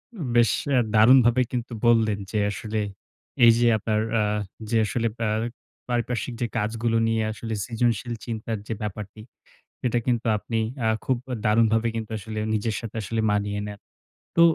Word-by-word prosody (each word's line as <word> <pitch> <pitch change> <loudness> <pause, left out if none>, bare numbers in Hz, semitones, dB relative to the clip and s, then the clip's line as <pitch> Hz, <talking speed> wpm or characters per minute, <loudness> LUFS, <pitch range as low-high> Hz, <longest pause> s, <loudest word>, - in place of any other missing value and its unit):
উম 165 -10 -4
বেশ 115 -3 +5 0.2
অ্যা 130 -3 +4
দারুণভাবেই 120 +2 +6
কিন্তু 120 0 -3
বললেন 110 -3 +4
যে, 110 - -1
আসলে 110 +1 -3 0.7
এই 115 - +9
যে 120 - +4
আপনার 110 0 0 0.2
আ - - +3 0.5
যে 115 - +2
আসলে 115 +2 0
অ্যা 115 - 0 0.6
পারিপার্শ্বিক 120 +1 -1
যে 120 - +1
কাজগুলো 115 +2 0
নিয়ে 115 0 +1
আসলে 110 +1 -5
সৃজনশীল 120 0 0
চিন্তার 115 -1 -3
যে - - -2
ব্যাপারটি, 105 0 -6 0.6
সেটা 120 -1 +1
কিন্তু 120 -2 +1
আপনি 115 +2 -2 0.3
আ - - +3 0.2
খুব 130 -2 +1 0.3
দারুণভাবে 115 +1 +3
কিন্তু 110 -1 -4
আসলে 110 +1 -6
নিজের 110 +1 -1
সাথে 115 -1 -8
আসলে 110 +3 -1
মানিয়ে 105 0 0
নেন। 105 0 -8 0.6
তো 170 - +5
115 Hz, 155 wpm, -25 LUFS, 110-120 Hz, 0.7 s, এই